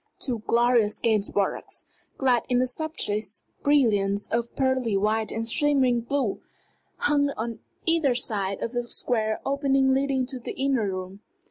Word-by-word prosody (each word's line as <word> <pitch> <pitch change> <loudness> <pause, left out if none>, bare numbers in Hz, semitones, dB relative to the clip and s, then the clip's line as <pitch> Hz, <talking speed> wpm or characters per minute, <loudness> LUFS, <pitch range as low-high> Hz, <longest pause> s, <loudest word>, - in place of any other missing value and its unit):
Two 245 -4 -2
glorious 235 -3 +3
Gainsboroughs, 205 -3 -1 0.3
clad 250 -3 +3
in 250 - +2
the 255 - +3
subtlest 245 -7 -1 0.2
brilliance 205 -8 +2
of 235 +1 -2
pearly 260 -6 +1
white 215 +2 0
and 225 +1 -3
shimmering 260 -2 +2
blue, 250 -3 -1 0.6
hung 290 -12 +2
on 225 0 -4 0.3
either 325 -6 +2
side 200 -6 -1
of 230 - -2
the 245 -1 -3
square 220 -3 -1
opening 275 -1 +2
leading 270 -1 +1
to 260 0 -6
the 235 - -6
inner 265 -6 +1
room. 185 +1 -6
240 Hz, 140 wpm, -26 LUFS, 215-270 Hz, 0.6 s, glorious